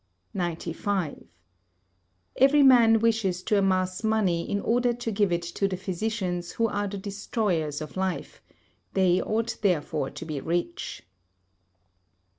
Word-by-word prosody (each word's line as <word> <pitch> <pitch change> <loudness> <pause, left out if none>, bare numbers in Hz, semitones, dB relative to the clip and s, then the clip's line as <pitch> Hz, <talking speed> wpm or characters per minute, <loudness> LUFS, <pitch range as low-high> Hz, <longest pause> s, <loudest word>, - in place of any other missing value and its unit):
95. 175 0 -3 1.1
Every 280 +2 +6
man 235 -4 +7
wishes 215 -6 +1
to 210 - +2
amass 185 0 0
money 205 -6 +1
in 200 - 0
order 245 +1 +2
to 235 -1 -4
give 205 -2 +1
it 170 0 0
to 170 +3 -1
the 185 -2 -3
physicians 185 -2 -3
who 230 - +1
are 205 -1 -2
the 200 0 -5
destroyers 195 - -2
of 155 - -7
life; 190 -1 -3 0.5
they 185 -1 +3
ought 225 +2 -1
therefore 155 -7 0
to 165 - -8
be 150 -4 -4
rich. 175 - -3
195 Hz, 130 wpm, -26 LUFS, 175-220 Hz, 1.1 s, man